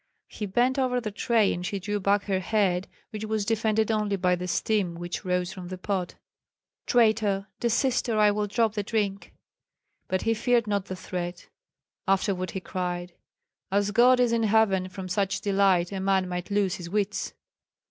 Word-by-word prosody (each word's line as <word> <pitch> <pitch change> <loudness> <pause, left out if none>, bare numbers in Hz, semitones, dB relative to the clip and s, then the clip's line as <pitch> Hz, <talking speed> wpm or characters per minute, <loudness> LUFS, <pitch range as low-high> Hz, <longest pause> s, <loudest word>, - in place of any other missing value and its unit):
He 210 - -5
bent 245 +7 +2
over 250 -1 +1
the 220 -3 -4
tray, 220 0 +2
and 175 - -5
she 200 +2 -2
drew 205 +2 -2
back 200 +1 +2
her 195 -2 0
head, 190 -2 +1 0.2
which 215 -1 -5
was 215 -1 -1
defended 220 0 +1
only 210 -2 0
by 180 -1 +2
the 180 +1 -5
steam 185 0 0
which 175 +3 -5
rose 180 0 -1
from 180 -1 -8
the 185 +1 -6
pot. 185 -1 -3 0.7
"Traitor! 215 -4 +3
desist, 245 +2 +1
or 220 - +1
I 210 -1 +5
will 210 0 -1
drop 220 +1 +1
the 210 - -1
drink." 200 -2 -2 0.8
But 185 - -1
he 225 - +2
feared 235 +1 +2
not 200 -2 -1
the 190 - -5
threat; 180 -1 -6 0.6
afterward 190 -1 +1
he 190 - -4
cried, 180 -1 -4 0.6
"As 200 +1 +1
God 245 +3 +5
is 245 -2 +3
in 230 -1 +2
heaven, 205 -4 +2
from 185 0 -7
such 195 0 0
delight 195 -3 +2
a 195 - -3
man 190 -1 +1
might 180 0 -4
lose 200 -3 +1
his 170 -2 -8
wits!" 205 +1 -2
200 Hz, 180 wpm, -27 LUFS, 185-220 Hz, 0.8 s, I